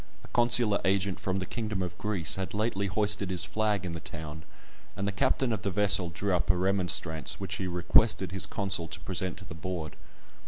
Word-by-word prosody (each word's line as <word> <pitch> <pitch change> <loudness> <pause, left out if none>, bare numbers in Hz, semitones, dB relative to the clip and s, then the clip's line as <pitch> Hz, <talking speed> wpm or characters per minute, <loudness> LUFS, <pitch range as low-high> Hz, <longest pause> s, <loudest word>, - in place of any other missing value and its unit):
A - - -13
consular 120 -3 +5
agent 95 -1 +1
from 95 0 -2
the 95 - -3
kingdom 110 -4 -3
of 90 -1 -5
Greece 100 -7 +1
had 95 0 -3
lately 100 -2 -1
hoisted 100 0 0
his 90 -2 0
flag 105 -3 -1
in 90 - -4
the 85 - -5
town, 80 -1 -8 0.5
and 100 - -2
the - - 0
captain 130 +2 +1
of 105 - -3
the 100 - -1
vessel 100 -2 +3
drew 95 +3 -1
up 90 - -1
a 95 - +4
remonstrance, 90 -4 0
which 100 0 -4
he 95 - -3
requested 90 +2 +3
his 95 0 -2
consul 95 -4 -1
to 80 0 -7
present 90 0 -2
to 95 - -11
the 85 - -9
Board. 80 -1 -5
95 Hz, 205 wpm, -29 LUFS, 90-105 Hz, 0.5 s, consular